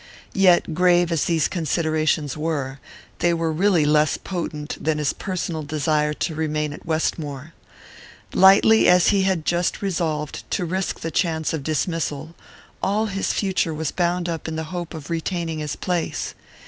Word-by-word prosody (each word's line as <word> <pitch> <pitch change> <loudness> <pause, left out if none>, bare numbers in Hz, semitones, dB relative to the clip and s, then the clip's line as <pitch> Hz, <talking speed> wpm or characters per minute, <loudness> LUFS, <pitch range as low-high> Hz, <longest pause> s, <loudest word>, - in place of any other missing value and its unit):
Yet, 180 -4 +4
grave 175 0 +3
as 165 -3 +1
these 165 -3 +2
considerations 155 -3 0
were, 145 -4 -3 0.4
they 170 -1 +2
were 165 -1 -1
really 175 -1 +3
less 150 0 +3
potent 160 -5 -5
than 155 0 +1
his 150 -2 0
personal 175 -4 -3
desire 150 0 0
to 165 - -2
remain 150 -1 -1
at 155 - -12
Westmore. 155 -2 -2 0.8
Lightly 195 +3 +6
as 180 0 +5
he 200 -2 +3
had 190 -5 0
just 175 +3 0
resolved 160 -6 -2
to 180 - -1
risk 185 +3 -2
the 165 - -3
chance 160 -3 0
of 160 - -2
dismissal, 155 0 -2 0.5
all 210 +3 +1
his 195 -2 -1
future 190 -5 0
was 155 -1 -2
bound 175 0 0
up 165 -2 -4
in 160 - -4
the 160 - -2
hope 175 -2 -5
of 155 +1 -8
retaining 165 -1 -2
his 150 -1 -3
place. 180 -3 -2
165 Hz, 160 wpm, -23 LUFS, 155-180 Hz, 0.8 s, Lightly